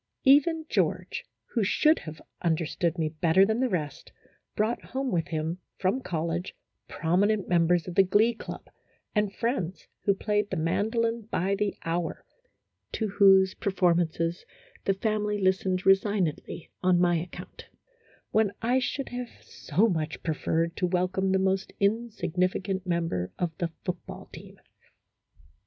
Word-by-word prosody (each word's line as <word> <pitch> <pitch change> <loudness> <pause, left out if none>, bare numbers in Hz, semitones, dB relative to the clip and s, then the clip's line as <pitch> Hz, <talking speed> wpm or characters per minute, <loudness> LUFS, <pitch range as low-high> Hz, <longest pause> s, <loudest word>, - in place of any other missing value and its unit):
Even 305 +4 +5
George, - - -1 0.3
who 230 - +2
should 305 +10 +3
have 155 0 -9 0.2
understood 165 +1 0
me 160 -2 +1
better 165 +4 +4
than 220 +3 0
the 260 -1 +1
rest, 155 - -4 0.4
brought 220 +3 0
home 265 0 -3
with 170 -4 0
him 160 +2 -3 0.2
from 195 +8 0
college 170 -1 -3 0.3
prominent 195 +5 +1
members 175 0 +2
of 180 - -5
the 195 - +6
glee 205 +5 +3
club, 225 - -8 0.5
and 210 -2 +1
friends 190 -7 -2 0.2
who 200 - +4
played 210 0 0
the - - -2
mandolin 220 +7 0
by 190 0 0
the 200 0 -1
hour, 165 0 -2 0.7
to 220 -2 -2
whose 195 -1 +5
performances 175 -3 0 0.4
the 195 - +2
family 210 0 -1
listened 185 -1 +1
resignedly 195 -4 +1
on 180 -1 +3
my 175 -1 +3
account, 175 +2 -8 0.6
when 215 -2 +3
I 245 +3 +2
should 270 +2 -3
have 245 -1 -5
so 185 +9 0
much 160 -6 -2
pre 160 - 0
ferred 165 +2 0
to 180 - +1
welcome 185 +1 0
the 190 - +3
most 190 0 0
insignificant 195 -3 0
member 165 - -1
of 170 -3 -2
the 170 - 0 0.2
football 180 -1 -6
team. - - -11
190 Hz, 140 wpm, -27 LUFS, 170-210 Hz, 0.7 s, the